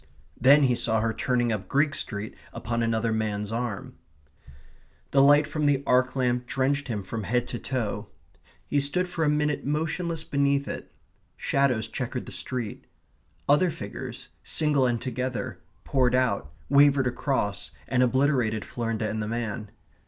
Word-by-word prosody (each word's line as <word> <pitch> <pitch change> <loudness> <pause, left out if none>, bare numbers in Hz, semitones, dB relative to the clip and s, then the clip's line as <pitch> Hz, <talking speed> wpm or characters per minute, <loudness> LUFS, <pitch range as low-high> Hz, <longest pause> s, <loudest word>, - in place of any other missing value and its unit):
Then 140 +4 +7
he 130 -2 +4
saw 110 -2 +1
her 110 0 0
turning 120 -1 +1
up 105 -3 -3
Greek 145 +5 +2
Street 105 -5 -4 0.2
upon 115 +1 -2
another 115 0 +1
man's 105 -1 -2
arm. 115 -3 -4 1.1
The 135 - +5
light 145 +2 +6
from 150 0 -1
the 140 -1 +2
arc 125 0 +3
lamp 125 -1 0
drenched 140 +2 0
him 105 -5 -3
from 110 +4 -4
head 120 +4 0
to 120 - -4
toe. 110 -5 -3 0.6
He 145 - +1
stood 180 +7 0
for 175 -2 -2
a 150 - +3
minute 150 -1 +1
motionless 160 +2 -1
beneath 140 -1 +1
it. - - -6 0.5
Shadows 135 -5 +1
chequered - - -4
the - - -9
street. 120 -5 -4 0.6
Other 150 +6 +4
figures, - - -7
single 150 -4 +2
and 120 -1 0
together, 125 +1 -3 0.2
poured 125 -2 +2
out, 100 - +1 0.2
wavered 140 -1 +5
across, 120 -6 -1 0.2
and 130 -1 +2
obliterated 125 -4 +2
Florinda 115 -2 -2
and 110 0 -2
the 105 - -3
man. 110 -2 -3
125 Hz, 150 wpm, -27 LUFS, 115-140 Hz, 1.1 s, Then